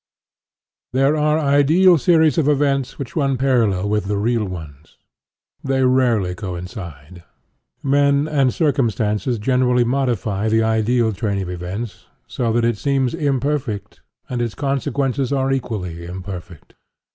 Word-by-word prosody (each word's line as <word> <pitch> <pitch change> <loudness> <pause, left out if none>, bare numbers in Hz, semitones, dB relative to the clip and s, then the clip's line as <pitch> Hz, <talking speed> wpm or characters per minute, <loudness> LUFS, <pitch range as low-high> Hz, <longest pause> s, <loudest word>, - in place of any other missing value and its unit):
There 135 +3 +3
are 150 0 +2
ideal 155 +5 +4
series 160 +2 +3
of 150 - +1
events 140 -3 +1
which 135 -4 -7
run 135 -4 +1
parallel 115 -8 +1
with 105 -1 0
the 100 +1 -1
real 115 +1 0
ones. 80 -5 -9 0.7
They 135 -1 +1
rarely 120 -8 +2
coincide. 90 - -8 0.6
Men 140 +1 +2
and 140 -4 +2
circumstances 120 - 0
generally 125 +2 +2
modify 115 -5 -1
the 110 +1 +2
ideal 110 +1 +1
train 100 -1 -2
of 90 - -6
events, 95 +5 -6 0.2
so 120 -2 -2
that 115 +1 +1
it 115 -3 0
seems 135 -3 0
imperfect, 140 -7 -2 0.3
and 125 -1 -3
its 115 -4 -3
consequences 135 0 -1
are 135 -1 +1
equally 95 -10 -3
imperfect. 90 -2 -8
120 Hz, 130 wpm, -20 LUFS, 100-140 Hz, 0.7 s, ideal